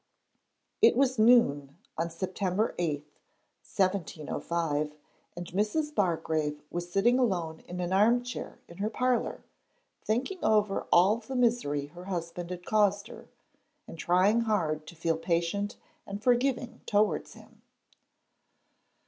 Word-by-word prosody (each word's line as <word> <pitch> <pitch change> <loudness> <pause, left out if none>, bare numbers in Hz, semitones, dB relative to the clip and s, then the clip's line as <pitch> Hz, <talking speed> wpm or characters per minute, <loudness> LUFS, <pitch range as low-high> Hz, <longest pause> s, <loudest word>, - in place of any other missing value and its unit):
It - - +6
was 260 -3 +2
noon, 145 - +4 0.2
on 165 +1 -1
September 190 +4 -1
8, 150 -4 -1 0.6
1705, 165 -4 -2 0.4
and 175 +1 -6
Mrs. 215 - -1
Bargrave 160 - 0
was 175 0 -4
sitting 240 +7 +3
alone 175 -9 0
in 180 +1 -6
an 180 +1 -2
armchair 240 +5 +1
in 170 - -13
her 210 +2 0
parlour, 250 +2 -1 0.6
thinking 265 - -2
over 210 -2 +2
all 190 +5 +5
the 235 +3 -7
misery 230 - +1
her 175 +5 -12
husband 175 -2 -4
had 180 -1 -7
caused 205 -2 +2
her - - -12 0.6
and 165 - -10
trying 190 +7 +3
hard 160 -9 -1
to 170 - -10
feel 165 0 0
patient 170 +5 -1 0.3
and 200 +2 -6
forgiving 245 -1 +1
towards 210 0 +1
him. - - -17
190 Hz, 125 wpm, -29 LUFS, 170-225 Hz, 0.6 s, It